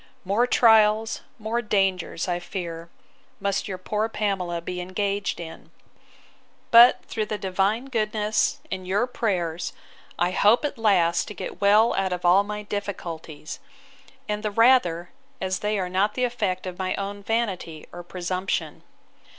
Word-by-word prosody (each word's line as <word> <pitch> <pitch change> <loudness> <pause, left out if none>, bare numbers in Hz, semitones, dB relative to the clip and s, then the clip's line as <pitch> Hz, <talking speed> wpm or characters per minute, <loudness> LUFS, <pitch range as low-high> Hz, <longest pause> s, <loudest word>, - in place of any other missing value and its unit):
—More 210 +6 +2
trials, 220 -2 +4 0.2
more 225 +2 -2
dangers, 195 -6 0
I 175 -1 -1
fear, 170 -2 -6 0.5
must 200 -1 -1
your 190 -2 -4
poor 210 +4 -2
Pamela 190 -6 -2
be 180 +1 -5
engaged 200 +2 -2
in: 165 -1 -9 1.0
But 235 +2 +8
through 215 -1 -3
the 210 - -3
Divine 195 +5 0
goodness, 215 -4 0
and 185 -1 -4
your 200 +6 +2
prayers, 180 -9 -2 0.4
I 175 +1 +1
hope, 210 +8 +4
at 285 -4 -4
last, 180 -6 +3
to 210 - -8
get - - -7
well 210 +3 +5
out 190 -1 0
of 180 0 -5
all 185 +3 +6
my 210 0 -5
difficulties; 170 -7 -6 0.7
and 210 0 -2
the 210 - -1
rather, 205 -7 +3 0.3
as 185 0 -2
they 210 0 -1
are 185 -2 -1
not 195 +3 0
the 255 - -1
effect 220 -8 -1
of 180 0 -6
my 185 0 -1
own 200 +1 -5
vanity 195 -8 -2
or 175 - -7
presumption! 180 +2 -3
200 Hz, 150 wpm, -25 LUFS, 180-215 Hz, 1.0 s, But